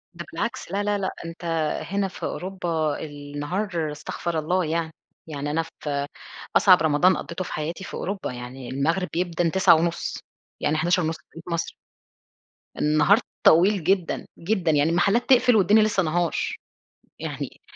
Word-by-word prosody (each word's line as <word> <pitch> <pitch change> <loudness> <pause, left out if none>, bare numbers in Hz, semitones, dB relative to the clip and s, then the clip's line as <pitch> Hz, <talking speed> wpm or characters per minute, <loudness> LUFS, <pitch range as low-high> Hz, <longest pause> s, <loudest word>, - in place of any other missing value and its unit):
ده 170 - -7
بالعكس، 235 +3 -3
لا، 200 +1 0
لا، 205 0 +1
لأ، 190 -1 -2
أنتَ 165 +1 -8 0.4
هنا 200 0 0
في 185 - -11
أوروبا 170 -5 -2
النهار، 150 +4 -3
استغفر 160 +2 -3
الله 180 +3 0
يعني، 160 0 -2 0.3
يعني 145 -1 -4
أنا 165 +2 +1
في 145 -3 -4 0.5
أصعب 185 -2 +7
رمضان 160 +4 +4
قضِّيته 170 +2 -5
في - - -7
حياتي 165 +5 -4
في - - -9
أوروبا 195 -5 -3
يعني، 125 +1 -8
المغرَب 165 +7 0
بيأذَّن 170 -1 0
21:30 170 -2 +3 0.4
يعني 155 +1 +1
23:30 175 +2 +2
في 160 - -6
توقيت 165 - -11
مصر. 170 - -2 1.1
النهار 155 +8 +4 0.2
طويل 185 +3 +5
جدًا، 185 -1 +1
جدًا، 180 -2 +1
يعني 150 +1 +3
المحلات 200 +9 +2
تقفل 250 -2 +6
والدنيا 215 +1 +5
لسه 210 -3 +2
نهار. 170 +1 0 0.8
يعني - - -6
170 Hz, 145 wpm, -24 LUFS, 155-190 Hz, 1.1 s, أصعب